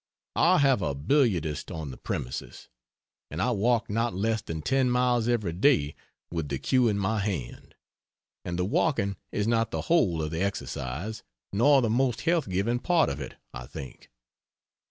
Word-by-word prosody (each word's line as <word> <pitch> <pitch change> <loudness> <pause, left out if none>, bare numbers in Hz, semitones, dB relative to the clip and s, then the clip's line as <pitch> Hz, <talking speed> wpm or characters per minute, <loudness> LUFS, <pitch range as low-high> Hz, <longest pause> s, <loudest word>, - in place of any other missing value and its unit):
I - - +5
have 135 -6 +3
a 70 - -1
billiardist 85 - +1
on 80 -4 -5
the - - -10
premises, 60 - -5 0.6
and 75 - -6
I 105 +7 +2
walk 115 +2 +1
not 115 -1 -1
less 110 +3 0
than 80 -6 -6
ten 130 - +2
miles 125 -2 +2
every 105 -8 0
day 90 - +3 0.4
with 80 -4 -3
the 70 - -1
cue 125 - +2
in 105 -2 +1
my 105 +2 0
hand. 95 - -4 0.7
And 85 -1 -4
the 90 - 0
walking 100 - +1 0.2
is 105 - -1
not 115 -1 +2
the - - -3
whole 95 - +2
of 75 - -3
the 80 +1 -2
exercise, 95 - -3 0.3
nor 135 +6 +5
the 115 - +1
most 125 0 +1
health 165 - +1
giving 100 +7 0
part 170 +3 +2
of - - -4
it, - - -7 0.2
I - - -7
think. 65 -2 -10
105 Hz, 175 wpm, -27 LUFS, 80-125 Hz, 0.7 s, I